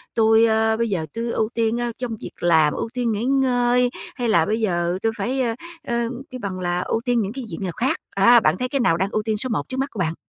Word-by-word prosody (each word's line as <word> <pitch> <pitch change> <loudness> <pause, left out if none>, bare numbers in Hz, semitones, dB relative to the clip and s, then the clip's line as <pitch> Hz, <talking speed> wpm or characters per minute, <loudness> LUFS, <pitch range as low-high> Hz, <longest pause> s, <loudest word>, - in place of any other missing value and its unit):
"Tui, 225 0 +5
ơ, 220 0 +2
bây 230 0 0
giờ 175 -6 -1
tui 230 +1 -3
ưu 220 0 0
tiên, 230 0 0
ơ, 240 - -1
trong 245 -3 -4
việc - - -7
làm, 160 -3 +4
ưu - - -3
tiên 245 -2 0
nghỉ 210 +1 -2
ngơi 250 -2 +2 0.3
hay 240 -2 -1
là 170 -7 +4
bây 215 +4 -1
giờ 175 -3 0
tui 225 - +2
phải, 265 +2 -1 0.5
ơ, 235 -1 0 0.2
cái 255 - -6
bằng 195 -4 -4
là 175 -1 -1
ưu 225 - -1
tiên 245 -2 +2
những 200 0 -3
cái 260 -1 -6
việc - - -5
nào 185 - -2
khác!" 245 +10 0 0.2
A, 235 +5 +7
bạn 160 -5 +2
thấy 255 - -1
cái 275 - -1
nào 165 -8 +3
đang 190 +3 0
ưu 215 - -1
tiên 215 -1 -1
số 255 +4 -1
một 175 -10 -2
trước 260 - -4
mắt 270 +1 -1
của 210 - -8
bạn? 160 -2 0
225 Hz, 270 wpm, -22 LUFS, 195-245 Hz, 0.5 s, A